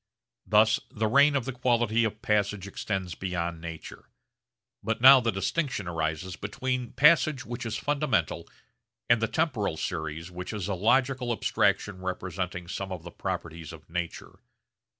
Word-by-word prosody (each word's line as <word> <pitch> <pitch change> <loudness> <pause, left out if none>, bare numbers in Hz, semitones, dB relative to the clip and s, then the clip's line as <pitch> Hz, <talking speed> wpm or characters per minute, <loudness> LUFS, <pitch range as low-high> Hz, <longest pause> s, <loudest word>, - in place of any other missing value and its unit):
Thus 110 +1 +4
the 110 - -2
reign 140 +5 +5
of 135 -4 0
the 135 - -3
quality 120 -2 +2
of 110 0 -4
passage 105 -2 0
extends 95 -3 -3
beyond 85 -2 -3
nature. 85 -1 -9 0.7
But 115 +2 -2
now 130 +2 +9
the 120 -2 0
distinction 105 - -2
arises 80 +2 -2
between 125 +4 -3
passage 150 -3 +4
which 120 +1 -5
is 110 0 -3
fundamental 140 - 0 0.6
and 120 -1 +4
the 115 - +2
temporal 125 - -1
series 80 +1 -4
which 90 +4 -6
is 100 -3 -3
a 100 - -1
logical 125 +6 +2
abstraction 105 -3 0
representing 90 -1 -4
some 95 +2 -5
of 90 -3 -6
the 85 - -9
properties 85 -4 -5
of 80 0 -14
nature. 85 -1 -5
105 Hz, 150 wpm, -28 LUFS, 90-120 Hz, 0.7 s, now